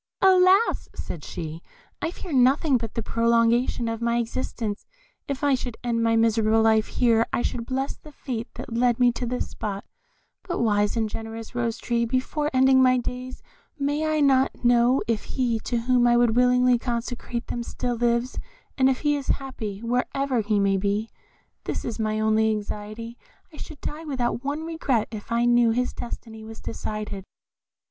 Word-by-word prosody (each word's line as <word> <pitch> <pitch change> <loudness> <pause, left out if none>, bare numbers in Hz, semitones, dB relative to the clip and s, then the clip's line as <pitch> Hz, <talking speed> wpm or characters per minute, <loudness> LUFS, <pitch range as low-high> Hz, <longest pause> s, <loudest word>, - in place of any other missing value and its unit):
"Alas!" 380 +3 +4
said 155 - -6
she, 160 +1 -6 0.4
"I 325 - 0
fear 350 -1 -8
nothing 265 +1 +4
but 230 -2 -6
the 230 - -2
prolongation 230 +1 +2
of 225 0 -3
my 235 0 +1
existence; 230 -2 -3 0.4
if 280 +1 -4
I 285 -1 +4
should 250 -2 -3
end 235 -1 0
my 230 0 +3
miserable 225 -1 +3
life 220 -1 +3
here, 230 -2 +2
I - - 0
should 235 -1 -3
bless 265 +1 -2
the 305 - -14
fate 245 -5 -5
that - - -7
led 240 0 +2
me 245 -1 +5
to 240 +1 -4
this 250 +1 -2
spot; 200 -2 -5 0.6
but 360 -1 -4
wise 210 -1 +1
and 220 -1 +1
generous 225 +1 -7
Rose 235 -1 -1
tree, 235 0 0
before 260 +5 -1
ending 260 0 +5
my 255 0 +5
days, 250 +1 -5 0.3
may 290 +2 0
I 310 -1 +1
not 265 -3 +2
know 240 +2 +4
if 230 -2 -1
he 240 -4 +1
to 240 -2 -1
whom 245 0 +3
I 240 0 +4
would 240 -2 +3
willingly 250 0 +4
consecrate 240 0 -4
them 240 - -4
still 245 +1 -3
lives; 235 +1 0 0.4
and 260 0 +5
if 260 - -1
he 295 -1 +2
is 280 -2 -5
happy, 225 -7 -3
wherever 250 +2 0
he 210 -1 +1
may 195 -1 +2
be? 205 +3 -1 0.5
This - - -3
is 230 -1 -4
my 215 0 0
only 220 0 +3
anxiety. 215 +2 -5 0.3
I - - -12
should 305 -1 -9
die 310 +2 -5
without 250 -4 -2
one 290 +3 -2
regret 285 -9 -1
if 215 0 -8
I 235 +1 +2
knew 240 -1 +4
that 225 - +1
his 250 0 0
destiny 225 -2 -7
was 220 0 -10
decided." 210 -3 -5
240 Hz, 180 wpm, -25 LUFS, 225-260 Hz, 0.6 s, me